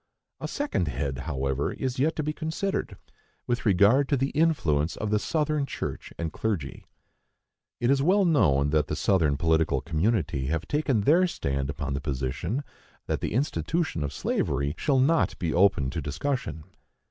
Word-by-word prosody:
A - - -4
second 285 - -1
head, 70 0 -2
however, 70 -1 -1
is 130 -1 -3
yet 155 +4 +2
to 155 - -2
be 150 +1 -2
considered, 160 +6 -3 0.5
with 120 -1 -1
regard 105 +8 +4
to 140 - +2
the 135 +2 0
influence 85 - +1
of 105 -1 -3
the 105 - +3
Southern 150 +1 0
church - - -5
and 80 -2 -3
clergy. 95 -11 -3 0.9
It 120 +2 +2
is 140 -1 +3
well 190 +6 +4
known 75 - +3
that 75 -1 +2
the - - -2
Southern 80 -8 +2
political 80 -3 +2
community 80 - 0
have 80 +2 -2
taken 145 -7 +1
their 170 - +4
stand 70 - -2
upon 70 -1 -3
the 70 - -2
position 75 - -2 0.4
that - - -2
the - - -2
institution 150 - -1
of 70 - -3
slavery 70 +1 -1
shall 135 - +1
not 150 +6 +2
be 85 -4 -2
open 85 -8 +3
to - - -3
discussion. 125 - -3
100 Hz, 165 wpm, -27 LUFS, -, 0.9 s, regard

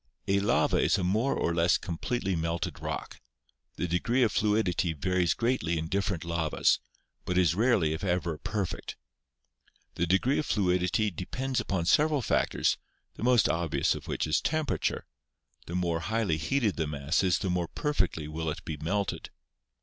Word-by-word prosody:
A 100 +1 +3
lava 100 - +2
is - - +3
a 95 - -2
more 110 +9 +1
or 85 - 0
less 85 +2 +3
completely 95 +2 -2
melted 85 0 -2
rock; - - -5 0.5
the 90 - -2
de 85 +1 +1
gree 125 +5 +2
of 115 - +2
fluidity 105 -5 +1
varies 90 +4 +1
greatly 115 -9 0
in 80 0 -3
different 95 -2 -1
lavas, 85 -2 +1 0.4
but 90 - -1
is 90 -4 +4
rarely 100 -7 +2
if 80 - -5
ever 85 -4 -1
perfect. 100 -3 -4 1.0
The 85 - -1
degree 95 - +2
of 150 - -2
fluidity 90 +1 +1
depends 130 +10 -3
upon 95 -4 -1
several 150 - +3
factors, - - +1 0.3
the - - -12
most 125 -2 +4
obvious 85 -1 +1
of - - -8
which - - -1
is 75 - +1
temperature; 155 -2 -1 0.6
the 85 - -5
more 85 -2 0
highly 105 -3 0
heated 105 - 0
the 80 -2 0
mass 75 +2 0
is, 90 -1 +3
the 95 - -2
more 90 -1 0
perfectly 95 - -1
will 80 +1 -3
it 75 - -6
be 80 -2 -4
melted. 100 +7 -2
90 Hz, 165 wpm, -29 LUFS, 85-110 Hz, 1.0 s, is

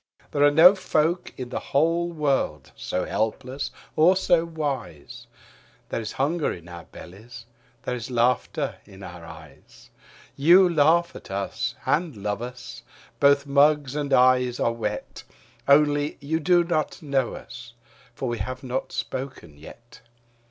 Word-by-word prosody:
There 145 - -1
are 145 - +7
no 165 +6 +8
folk 175 -2 -1
in 125 -2 -6
the - - -3
whole 165 +4 0
world 140 - -1
so 90 - -3
helpless 130 +5 -3 0.3
or 175 +4 +5
so 170 -3 +2
wise. 135 - -5 0.6
There - - -3
is 110 - -6
hunger 150 +4 0
in 85 -1 -9
our 85 -1 -10
bellies, 115 +6 -12 0.4
there 125 - -3
is 120 -1 -7
laughter 125 0 0
in 100 -1 -14
our 85 -2 -10
eyes; 80 -4 -15 0.4
You 175 +6 +6
laugh 170 +1 +2
at - - -11
us 100 0 -3
and 145 0 0
love 100 +1 -3
us, 125 +1 -8 0.4
both 140 0 +4
mugs 145 0 +3
and 145 -2 -3
eyes 125 -1 +3
are 115 - +1
wet: 105 -2 -5 0.4
Only 145 +1 +3
you 150 +3 -2
do 175 +2 +3
not 160 -3 -2
know 135 -4 -1
us. 120 0 -11 0.4
For 130 - -4
we 120 -2 -3
have 130 +6 -5
not 130 +1 -4
spoken 130 - -6
yet. 115 +11 -15
135 Hz, 145 wpm, -24 LUFS, 115-150 Hz, 0.6 s, no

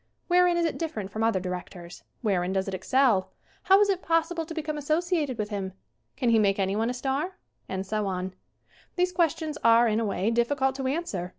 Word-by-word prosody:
Wherein 355 -1 +4
is 340 - +2
it 325 - -2
different 220 - -4
from 220 +2 -2
other 225 -4 +2
directors? 180 -1 -7 0.2
Wherein 190 -4 0
does 190 0 -1
it 195 - -4
excel? 215 +1 +2 0.3
How 385 +1 +5
is 415 - +5
it 385 -2 0
possible 330 0 0
to 330 - -6
become 305 -1 -3
associated 310 -2 0
with 210 -1 -2
him? 195 -3 -4 0.4
Can 245 - +1
he 225 - +5
make 200 -2 +2
anyone 200 +4 0
a - - -1
star? 275 +9 -2 0.3
And 190 0 -3
so 210 +1 -1
on. 185 0 -3 0.6
These 360 0 +1
questions 320 -3 0
are, 230 +1 +6
in 220 0 +1
a 230 - 0
way, 200 +1 0
difficult 265 +3 +1
to 265 -1 -2
answer. 260 - -2
235 Hz, 200 wpm, -27 LUFS, 195-320 Hz, 0.6 s, are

